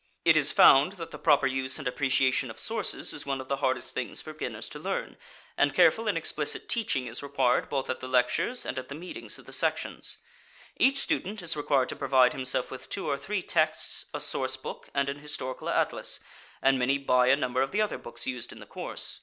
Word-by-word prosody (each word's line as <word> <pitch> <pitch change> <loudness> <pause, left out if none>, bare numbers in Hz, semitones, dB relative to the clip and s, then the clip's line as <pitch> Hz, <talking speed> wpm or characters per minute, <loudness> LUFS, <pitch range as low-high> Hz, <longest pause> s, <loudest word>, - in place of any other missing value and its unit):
It - - +7
is - - +5
found 145 +8 +7
that 170 -4 -8
the - - -8
proper 145 -3 +4
use 130 0 +1
and 140 -4 -4
appreciation 130 -1 +2
of 110 - -9
sources 225 -2 -1
is 145 - -6
one 135 -1 -1
of 130 - -8
the 140 - 0
hardest 130 -2 -1
things 120 -5 -2
for 155 - -6
beginners 155 - -5
to - - -8
learn, - - -3 0.4
and - - +2
careful - - +4
and - - +1
explicit - - -1
teaching 205 - 0
is 120 0 -6
required 135 -3 +1
both 135 -2 -1
at 130 - -3
the 130 - -6
lectures 130 - +1
and 130 - -3
at 130 - -9
the 140 - -6
meetings 175 +4 -5
of - - -15
the - - -9
sections. - - -1 0.6
Each 275 +1 +3
student 210 -6 -1
is 170 -1 0
required 140 -3 +1
to - - -4
provide 130 -2 +4
himself 130 -1 -1
with 130 - -9
two 200 - -3
or 145 - +1
three 190 +6 -3
texts, 155 -1 0
a 150 - -4
source 130 -2 0
book, 130 - -8
and 140 0 +1
an 140 +1 -4
historical 145 -3 -5
atlas, - - 0 0.4
and 135 -1 +4
many 135 +3 +2
buy 125 -2 +3
a 130 - +6
number 130 -2 -1
of 135 - +1
the 210 - 0
other 210 - -3
books 120 0 -3
used 125 -2 -4
in - - -11
the - - -11
course. - - -6
135 Hz, 220 wpm, -28 LUFS, 130-150 Hz, 0.6 s, It